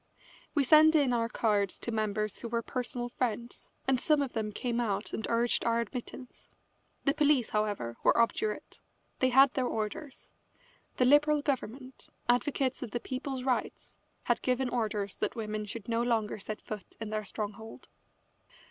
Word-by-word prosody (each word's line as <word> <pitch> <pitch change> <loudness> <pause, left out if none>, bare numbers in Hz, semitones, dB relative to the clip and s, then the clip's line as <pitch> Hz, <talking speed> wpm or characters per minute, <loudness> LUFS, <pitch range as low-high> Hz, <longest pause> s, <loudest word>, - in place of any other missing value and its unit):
We 290 - +4
sent 310 +4 +7
in 280 -5 +4
our 230 -1 +1
cards 205 -5 +1
to 235 - -3
members 215 -1 -1
who 235 - -5
were 230 0 -1
personal 245 0 -3
friends, 240 -1 -3 0.2
and 265 -2 +3
some 300 +1 +3
of 265 - -5
them 215 -2 -2
came 240 +3 -2
out 210 -5 -1
and 220 - -3
urged 235 +1 +1
our 230 0 +2
admittance. 245 +2 -7 0.6
The 275 - +4
police, 295 -5 +3
however, 205 - -1
were - - +4
obdurate. 430 - 0 0.4
They 260 - +3
had 265 +1 +6
their 255 -2 0
orders. 245 +7 -5 0.7
The 250 - +4
Liberal 295 +2 +5
government, 260 -1 -4 0.2
advocates 260 +1 +1
of 250 - -4
the 240 - -2
people's 260 +1 -4
rights, 255 -1 -2 0.3
had 240 -1 +1
given 255 0 +1
orders 215 -5 -2
that - - -2
women 215 -2 -3
should 210 0 -7
no 230 0 +1
longer 225 -3 0
set 210 +1 -6
foot 210 -3 -8
in 220 -1 -5
their 215 0 -1
stronghold. 215 +2 -7
240 Hz, 165 wpm, -30 LUFS, 215-260 Hz, 0.7 s, sent